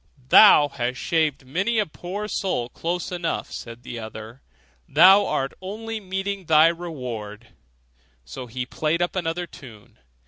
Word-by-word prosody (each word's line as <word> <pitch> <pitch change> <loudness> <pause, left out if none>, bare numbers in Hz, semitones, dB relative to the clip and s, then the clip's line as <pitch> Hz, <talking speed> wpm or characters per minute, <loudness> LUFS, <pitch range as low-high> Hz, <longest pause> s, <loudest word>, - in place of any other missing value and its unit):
'Thou 150 -7 +8
hast 125 -2 -3
shaved 155 -5 0
many 190 - -1
a 215 - +2
poor 190 +6 -6
soul 180 - -2
close 175 +7 -4
enough,' 175 -2 -3
said 115 +1 -9
the 120 -1 -7
other; 110 +3 -9 0.5
'thou 195 +2 +7
art 135 0 -2
only 220 +4 -5
meeting 195 0 -4
thy 155 0 +6
reward': 125 -11 -5 0.8
so 125 - -8
he 125 +2 -4
played 155 +5 -1
up 175 - -3
another 175 -1 -2
tune. 115 -10 -15
160 Hz, 140 wpm, -23 LUFS, 125-185 Hz, 0.8 s, Thou